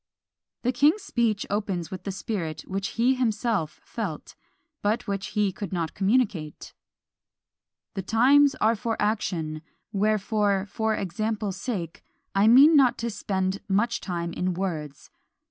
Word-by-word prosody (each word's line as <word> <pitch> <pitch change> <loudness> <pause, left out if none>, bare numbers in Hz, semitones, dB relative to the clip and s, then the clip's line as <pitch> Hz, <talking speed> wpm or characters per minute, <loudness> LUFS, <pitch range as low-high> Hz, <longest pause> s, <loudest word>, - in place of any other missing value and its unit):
The 250 - +2
king's 295 - +3
speech 225 -4 0
opens 195 -5 -2
with 185 -1 -7
the 200 - -2
spirit 185 -6 -4
which 195 +2 -4
he 245 +3 +4
himself 225 - -1
felt, 190 -10 -6 0.5
but 220 +4 0
which 195 -1 -2
he 205 -2 +3
could 195 -1 -6
not 170 -4 -2
communicate: 195 -7 0 1.2
"The 195 - -3
times 270 +8 +4
are 225 +2 +2
for 225 +1 -3
action: 170 -7 -1 0.3
wherefore, 205 -1 +1
for 220 +2 -1
example's 205 +1 -3
sake, 180 -10 -4 0.3
I 195 +2 +4
mean 275 +7 +8
not 255 -4 +5
to 235 0 -3
spend 190 -2 -2
much 230 +5 +1
time 170 -2 -3
in 180 0 -1
words! 155 -7 -4
205 Hz, 135 wpm, -26 LUFS, 185-230 Hz, 1.2 s, mean